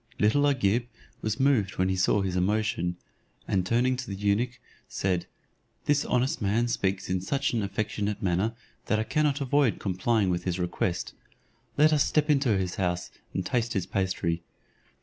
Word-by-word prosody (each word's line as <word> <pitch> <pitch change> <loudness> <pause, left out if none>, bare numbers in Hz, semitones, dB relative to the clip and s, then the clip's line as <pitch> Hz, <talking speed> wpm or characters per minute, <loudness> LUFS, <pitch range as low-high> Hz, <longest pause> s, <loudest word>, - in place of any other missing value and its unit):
Little 145 +7 +3
Agib 120 -3 +1 0.3
was 110 0 -2
moved 120 -9 +2
when 95 - +2
he 95 - +1
saw 95 +2 +2
his 95 -2 -2
emotion; 90 -2 0 0.5
and 95 -2 +1
turning 120 +6 +2
to 130 -1 -5
the 100 - -3
eunuch, 105 +5 0 0.3
said, 90 -2 -1 0.6
"This 145 -1 +2
honest 125 +1 0
man 110 +4 +1
speaks 95 -4 -1
in 90 0 -1
such 140 +9 -1
an 115 - +1
affectionate 105 +1 -2
manner, 95 +5 0 0.3
that 110 - +2
I 110 - +1
cannot 145 +4 +1
avoid 140 -2 +2
complying 95 +1 +1
with 90 0 -2
his 90 -1 -1
request; 90 0 -2 0.6
let 155 +1 +5
us 150 -2 +4
step 150 0 +2
into 135 -8 +3
his 90 -1 -2
house, 90 -2 -1 0.2
and 95 - -1
taste 120 +2 0
his 95 - -1
pastry." 90 -3 -1
105 Hz, 170 wpm, -27 LUFS, 95-125 Hz, 0.6 s, let